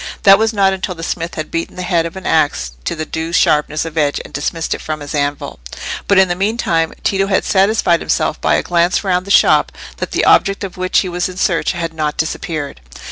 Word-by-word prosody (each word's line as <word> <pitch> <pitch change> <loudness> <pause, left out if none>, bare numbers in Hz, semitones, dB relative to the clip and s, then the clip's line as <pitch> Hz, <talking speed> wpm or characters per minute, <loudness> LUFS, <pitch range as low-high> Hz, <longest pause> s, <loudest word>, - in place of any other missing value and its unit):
That 195 0 +7
was 220 0 +2
not 195 -3 +2
until 190 -1 -4
the 165 - -8
smith 170 0 -3
had 155 -2 -5
beaten 165 0 -3
the 180 - -5
head 170 -2 +1
of 170 - -11
an 190 - -8
axe 145 - +1
to - - -2
the 155 -1 -4
due 160 +1 -4
sharpness 155 -1 +2
of 165 0 -3
edge 145 -1 +1
and - - -13
dismissed 160 +3 -2
it - - -6
from 155 -1 -4
his 145 -1 -7
anvil. 145 -1 -2 0.5
But 200 - +3
in 190 0 +6
the 175 - 0
meantime 180 -4 0
Tito 195 0 +1
had 190 -1 +1
satisfied 195 -3 +2
himself - - -1
by - - +2
a - - 0
glance 175 +2 +1
round 185 -1 0
the - - -7
shop - - +4 0.3
that - - -4
the - - 0
object 195 0 +3
of 190 -2 -6
which 185 0 +1
he 185 - -4
was 175 +1 -2
in 185 - -9
search 175 -1 +1
had 165 -2 -4
not 155 -2 -2
disappeared. 155 - -3
170 Hz, 235 wpm, -16 LUFS, 160-190 Hz, 0.5 s, That